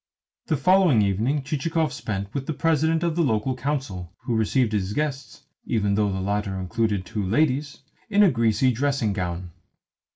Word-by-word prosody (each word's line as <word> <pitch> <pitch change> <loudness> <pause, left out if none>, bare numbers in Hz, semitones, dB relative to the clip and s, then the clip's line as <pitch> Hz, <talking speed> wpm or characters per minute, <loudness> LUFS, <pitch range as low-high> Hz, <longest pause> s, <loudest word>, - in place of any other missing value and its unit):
The 155 - +1
following 175 - +4
evening 115 +9 0
Chichikov 155 +3 -1
spent 100 0 -4
with 135 -1 -4
the 160 - -1
President 160 +1 +1
of 170 -2 0
the 170 - +2
Local 125 -2 0
Council, 125 - -3
who 120 - -1
received 110 +1 +1
his 100 -1 -1
guests 140 -3 -3 0.2
even 105 -3 +1
though 100 0 +1
the 95 - -3
latter 100 0 -2
included 100 +1 -1
two 105 +1 -3
ladies 140 +7 0 0.3
in 205 0 +5
a 195 - +5
greasy 115 +1 +2
dressing 130 -4 0
gown. 90 -2 -4
115 Hz, 165 wpm, -24 LUFS, 100-145 Hz, 0.3 s, in